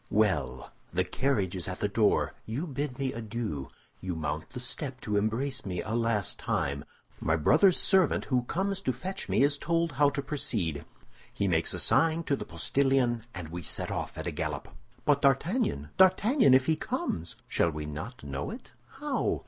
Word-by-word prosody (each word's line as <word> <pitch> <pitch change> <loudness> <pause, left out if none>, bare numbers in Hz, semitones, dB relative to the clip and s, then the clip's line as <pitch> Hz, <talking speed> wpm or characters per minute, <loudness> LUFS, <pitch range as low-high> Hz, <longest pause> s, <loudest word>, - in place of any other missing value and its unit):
"Well! 95 -11 +1 0.2
The 90 +2 +1
carriage 105 -7 0
is 90 -4 -3
at - - -5
the - - +1
door; - - +2
you 125 +10 -2
bid 140 -3 -3
me 135 -1 -1
adieu; 110 - -4 0.3
you 90 -2 -4
mount 80 0 -3
the 125 -1 -7
step 130 +1 -4
to 105 - -2
embrace 115 +6 0
me 90 -3 -3
a 110 - -5
last 115 -4 0
time; 70 +2 -1 0.3
my 80 - +1
brother's 155 - +5
servant, 190 -5 +3
who 130 -2 +2
comes 195 +6 -1
to 130 - 0
fetch 185 - -5
me, - - +3
is 145 0 +2
told 170 -1 +1
how 145 +2 +4
to 140 -1 -3
proceed; 105 - -2 0.5
he 100 - -1
makes 80 -3 +1
a - - -2
sign 165 0 +4
to 145 - +1
the - - -6
postillion, 135 -4 +1
and 90 -3 -6
we 85 +2 -5
set - - +1
off - - -4
at - - -4
a - - -1
gallop." - - -4 0.4
"But 145 -1 +3
D'Artagnan! 140 - +1
D'Artagnan! 190 - +5
if 130 0 +4
he 160 - +3
comes?" 85 - -3
"Shall 85 - +2
we 75 -1 -5
not 80 +11 -7
know 70 0 -4
it?" - - -9 0.2
"How?" - - -1
125 Hz, 185 wpm, -29 LUFS, 90-145 Hz, 0.5 s, brother's